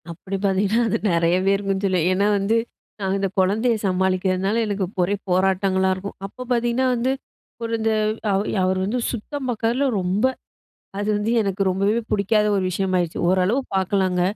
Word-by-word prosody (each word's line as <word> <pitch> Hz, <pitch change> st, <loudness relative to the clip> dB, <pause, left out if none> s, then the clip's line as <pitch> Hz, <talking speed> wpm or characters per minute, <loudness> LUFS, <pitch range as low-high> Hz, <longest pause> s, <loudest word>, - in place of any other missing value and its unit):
அப்படி 185 Hz, +4 st, -6 dB
பார்த்தீங்கன்னா 200 Hz, +4 st, +2 dB
அது 225 Hz, -, +1 dB
நிறையவே 175 Hz, +3 st, +2 dB
இருக்கும்னு 195 Hz, 0 st, -2 dB
சொல்வேன். 180 Hz, -3 st, +1 dB
ஏன்னா 200 Hz, +2 st, +2 dB
வந்து 200 Hz, +3 st, +1 dB, 0.4 s
நான் 195 Hz, -1 st, -1 dB
இந்த 195 Hz, 0 st, 0 dB
குழந்தையை 220 Hz, +5 st, +2 dB
சமாளிக்கிறதுனால 190 Hz, +3 st, +1 dB
எனக்கு 205 Hz, -2 st, -1 dB, 0.2 s
ஒரே 195 Hz, +3 st, 0 dB
போராட்டங்களா 190 Hz, +1 st, +2 dB
இருக்கும். 195 Hz, +2 st, -7 dB
அப்ப 250 Hz, +6 st, -8 dB
பார்த்தீங்கன்னா 240 Hz, +2 st, +1 dB
வந்து 245 Hz, +2 st, 0 dB, 0.5 s
ஒரு 230 Hz, -, -3 dB
இந்த 225 Hz, 0 st, +1 dB, 0.4 s
அவர் 195 Hz, +2 st, 0 dB, 0.2 s
அவர் 185 Hz, 0 st, +1 dB
வந்து 230 Hz, +6 st, -1 dB
சுத்தம் 260 Hz, +4 st, -5 dB
பார்க்கறதுல்ல 240 Hz, +3 st, 0 dB, 0.2 s
ரொம்ப 190 Hz, +6 st, +1 dB, 0.7 s
அது 205 Hz, +1 st, -2 dB
வந்து 210 Hz, +2 st, -1 dB
எனக்கு 195 Hz, -1 st, -2 dB
ரொம்பவே 200 Hz, +4 st, +1 dB
பிடிக்காத 210 Hz, +1 st, +2 dB
ஒரு 195 Hz, -, 0 dB
விஷயமாயிருச்சு. 185 Hz, -2 st, -1 dB
ஓரளவு 190 Hz, +8 st, +2 dB
பார்க்கலாங்க. 190 Hz, -1 st, +1 dB
195 Hz, 150 wpm, -22 LUFS, 185-220 Hz, 0.7 s, பார்த்தீங்கன்னா